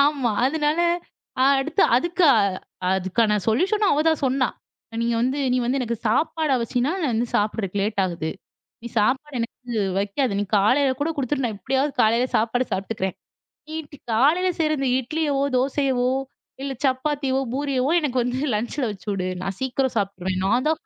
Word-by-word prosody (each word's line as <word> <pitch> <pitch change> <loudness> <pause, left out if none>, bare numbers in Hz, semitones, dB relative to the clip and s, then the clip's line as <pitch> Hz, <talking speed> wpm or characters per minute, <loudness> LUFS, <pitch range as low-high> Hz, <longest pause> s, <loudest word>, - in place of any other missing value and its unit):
ஆமா. 280 -5 +1 0.2
அதனால 300 +2 0 0.8
அடுத்து 315 +8 +1
அதுக்கு 345 +6 0
அ - - +5 0.6
அதுக்கான 210 +3 +1
சொல்யூஷனும் 390 - +2
அவ 295 - +2
தான் 320 -3 +1
சொன்னா. 260 -1 +1 0.5
நீங்க 235 0 +1
வந்து 260 +3 0
"நீ - - +2
வந்து 255 +3 0
எனக்கு 235 -2 -2
சாப்பாட 310 +6 +1
வச்சின்னா, 245 +5 0
நான் 275 -6 +1
வந்து 235 +2 0
சாப்பட்றதுக்கு 205 -2 -1
லேட் 205 0 0
ஆகுது. 170 -3 -3 0.5
நீ 235 - -6
சாப்பாடு 265 +5 0
எனக்கு 235 0 -5 0.2
வைக்காத, 205 +7 0
நீ - - +1
காலையில் 260 +6 +3
கூட 300 +3 0
குடுத்துட்டு 270 -1 -1
நான் 220 -3 -2
எப்படியாவது 270 +6 0
காலையில் 235 +3 +2
சாப்பாடு 235 +3 +1
சாப்பிட்டுக்கிறேன். 190 -1 -2 0.5
நீ 315 - -5 0.4
காலையில 310 +11 +3
செய்ற 310 -1 +1
இந்த 270 -1 0
இட்லியவோ, 285 +1 -1 0.2
தோசையவோ 260 -1 +1 0.5
இல்ல 275 -1 -3
சப்பாத்தியோ, 265 0 0 0.2
பூரியவோ 275 -1 0
எனக்கு 260 -5 0
வந்து 245 +1 -2 0.2
லன்ச்சுல 240 +4 -1
வச்சு 205 +1 -12
உடு. 185 -1 -2
நான் 195 0 -4
சீக்கிரம் 260 -1 -1
சாப்ட்ருவேன்." 190 -2 -2
நான் 245 +7 +2
தான் 315 0 0
255 Hz, 155 wpm, -23 LUFS, 220-285 Hz, 0.8 s, அ